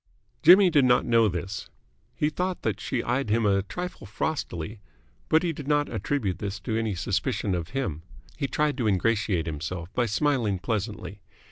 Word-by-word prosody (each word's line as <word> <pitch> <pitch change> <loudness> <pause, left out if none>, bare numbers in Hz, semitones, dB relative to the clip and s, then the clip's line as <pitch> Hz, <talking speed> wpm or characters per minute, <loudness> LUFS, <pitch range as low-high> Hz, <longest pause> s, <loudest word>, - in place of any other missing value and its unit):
Jimmy 185 +2 +8
did 145 -4 +5
not 125 -1 +4
know 115 -2 +4
this. 90 0 -4 0.5
He 150 +1 +1
thought 180 +3 -2
that - - -1
she 125 -4 -2
eyed 125 0 -1
him 115 +1 +2
a 100 -1 +3
trifle 180 - -6
frostily, 105 - -3 0.5
but 160 +2 +4
he 170 -2 0
did 145 -2 -8
not 145 0 +2
attribute 110 -11 -1
this 100 0 -4
to 110 +3 -2
any 110 -3 -1
suspicion 95 +3 -1
of 85 -1 -3
him. 80 - -2 0.3
He 140 - -2
tried 150 -1 0
to 115 - +1
ingratiate 100 -3 +1
himself 85 +4 -5
by 120 -1 +1
smiling 115 -3 +1
pleasantly. 105 -2 -4
110 Hz, 170 wpm, -26 LUFS, 95-145 Hz, 0.5 s, Jimmy